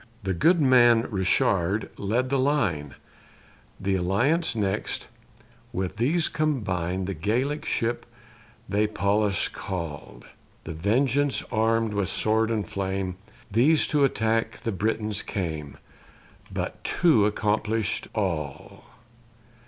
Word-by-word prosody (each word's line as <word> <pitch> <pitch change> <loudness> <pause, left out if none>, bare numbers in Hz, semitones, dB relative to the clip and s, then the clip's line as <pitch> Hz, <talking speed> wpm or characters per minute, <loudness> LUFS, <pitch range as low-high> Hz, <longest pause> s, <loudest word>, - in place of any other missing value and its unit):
The 95 0 0
Good 165 - +4
Man 120 -4 +5
Richard 95 0 +1
led 120 +6 -1
the 140 - +2
line; 100 - 0 0.8
The 100 - -1
Alliance 120 - +1
next: 100 -1 -1 0.7
with 95 +1 -3
these 150 +8 +2
combine 95 - -1
The 95 - -3
Gallic 120 - -1
ship 115 +1 -1 0.6
they 105 +2 +1
Pallas 105 -1 +1
call, 85 -6 -6 0.4
The - - -6
Vengeance 130 - +1
arm'd 115 0 +1
with 100 -2 0
sword 110 +1 +1
and 105 -5 -1
flame; 95 -1 -3 0.3
These 140 +9 +4
to 145 -2 +3
attack 115 -3 0
the 115 - -2
Britons 105 +1 -1
came 80 -7 -4 0.7
But - - -4
two 135 - +3
accomplish'd 105 0 -1
all. 80 -9 -3
105 Hz, 110 wpm, -26 LUFS, 95-120 Hz, 0.8 s, Man